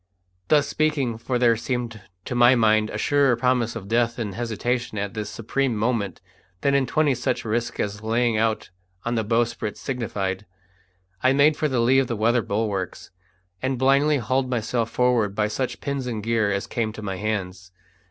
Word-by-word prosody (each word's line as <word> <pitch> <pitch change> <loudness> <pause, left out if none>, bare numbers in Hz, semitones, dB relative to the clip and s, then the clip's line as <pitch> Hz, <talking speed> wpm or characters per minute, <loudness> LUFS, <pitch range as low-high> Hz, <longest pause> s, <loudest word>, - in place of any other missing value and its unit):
Thus 150 -2 +4
speaking 140 -7 0
for 125 +2 -1
there 120 -1 +4
seemed 120 -2 -3 0.2
to - - -4
my 120 +1 +6
mind 110 -2 +3
a - - -4
surer 140 -4 +3
promise 120 -1 +1
of 105 -4 -7
death 115 +1 +1
in 110 -4 -3
hesitation 120 +1 -2
at 100 0 -3
this 105 -2 -4
supreme 120 +4 -1
moment 110 -2 -1 0.4
than 140 - +2
in 135 -2 +2
twenty 150 +1 +2
such 125 -1 -2
risks 120 +2 -2
as 105 0 -2
laying 115 +1 +1
out 110 -2 0 0.3
on 120 - 0
the 115 -2 0
bowsprit 115 -1 -1
signified 105 -6 -3 0.7
I 130 +1 +4
made 145 +2 +5
for 155 - 0
the 130 -4 0
lee 130 +3 +4
of 135 - +1
the 120 - -2
weather 115 +3 +2
bulwarks, 100 -3 -3 0.5
and 130 0 -1
blindly 140 +3 +3
hauled 130 +1 0
myself 115 -1 -1
forward 120 -6 +1
by 105 0 +1
such 120 +2 -3
pins 140 -2 -3
and 110 -4 -4
gear 110 -2 +1
as 100 0 -1
came 110 -2 -2
to 110 - -8
my 95 -2 -3
hands. 95 -3 -4
115 Hz, 180 wpm, -24 LUFS, 110-130 Hz, 0.7 s, my